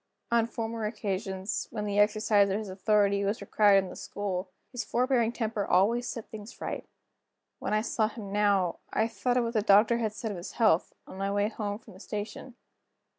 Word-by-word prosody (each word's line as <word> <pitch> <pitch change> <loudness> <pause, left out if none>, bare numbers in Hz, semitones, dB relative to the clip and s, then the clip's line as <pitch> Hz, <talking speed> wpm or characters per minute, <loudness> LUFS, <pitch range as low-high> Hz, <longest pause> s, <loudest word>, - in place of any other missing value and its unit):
On 230 -1 +3
former 225 -1 -3
occasions, 195 -2 -3
when 210 -2 -4
the 205 0 0
exercise 210 -1 +4
of 195 - 0
his 215 -2 -5
authority 200 +1 +2
was 200 +3 0
required 200 -1 +4
in 185 - -7
the - - -9
school, 190 -2 -4 0.2
his 245 - -3
forbearing 245 -2 +1
temper 220 -3 -2
always 225 +7 +2
set 230 - -6
things 215 +2 -9
right. - - -5 0.7
When - - -1
I 215 - +2
saw 220 -1 +1
him 210 -3 -8
now, 200 -4 +2
I 220 - +2
thought 245 +2 -1
of 245 - +3
what 230 0 -2
the 215 - +2
doctor 215 +3 +5
had 220 -2 -1
said 220 0 -4
of 195 - -5
his 175 - -7
health, 210 -7 +3
on 190 - -10
my 195 0 -1
way 205 +1 +1
home 205 -2 -4
from 220 - -16
the 185 - -14
station. 215 +5 -6
210 Hz, 200 wpm, -29 LUFS, 200-225 Hz, 0.7 s, doctor